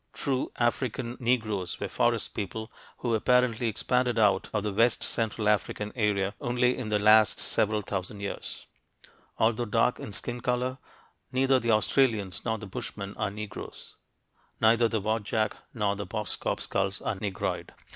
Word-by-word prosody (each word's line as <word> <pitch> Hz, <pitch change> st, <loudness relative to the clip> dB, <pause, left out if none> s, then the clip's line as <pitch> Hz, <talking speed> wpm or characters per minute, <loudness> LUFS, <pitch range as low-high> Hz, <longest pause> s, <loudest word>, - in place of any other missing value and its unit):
True 135 Hz, -2 st, -1 dB
African 120 Hz, 0 st, -1 dB
Negroes 110 Hz, -7 st, 0 dB
were -, -, -2 dB
forest -, -, +1 dB
people 110 Hz, +3 st, -4 dB, 0.3 s
who 120 Hz, -2 st, -1 dB
apparently 120 Hz, +1 st, +3 dB
expanded 125 Hz, +2 st, +1 dB
out 100 Hz, -3 st, +3 dB
of 105 Hz, -2 st, -1 dB
the 105 Hz, -1 st, -2 dB
west 115 Hz, +4 st, +3 dB
central 110 Hz, -2 st, -1 dB
African 105 Hz, 0 st, 0 dB
area 100 Hz, -4 st, +1 dB
only 125 Hz, +1 st, +2 dB
in 125 Hz, -5 st, -4 dB
the 105 Hz, -, +2 dB
last 105 Hz, 0 st, +5 dB
several 105 Hz, 0 st, +1 dB
thousand 100 Hz, 0 st, -4 dB
years. 100 Hz, 0 st, -6 dB, 0.7 s
Although 115 Hz, +1 st, +2 dB
dark 115 Hz, +3 st, +2 dB
in -, -, -6 dB
skin 120 Hz, +4 st, -4 dB
color, 125 Hz, +1 st, -1 dB, 0.5 s
neither 130 Hz, 0 st, +3 dB
the 115 Hz, -, -2 dB
Australians 110 Hz, -4 st, +2 dB
nor 110 Hz, -1 st, 0 dB
the 105 Hz, -, -8 dB
Bushmen 100 Hz, 0 st, -6 dB
are 105 Hz, -, -1 dB
Negroes; 105 Hz, +1 st, -8 dB, 0.6 s
neither 115 Hz, +1 st, +5 dB
the 110 Hz, -1 st, -1 dB
Wadjak 110 Hz, +1 st, 0 dB, 0.2 s
nor 105 Hz, -4 st, 0 dB
the 100 Hz, -1 st, -5 dB
Boskop 105 Hz, +1 st, -2 dB
skulls 95 Hz, 0 st, -1 dB
are -, -, 0 dB
"Negroid." 100 Hz, -1 st, -3 dB
110 Hz, 150 wpm, -28 LUFS, 105-120 Hz, 0.7 s, last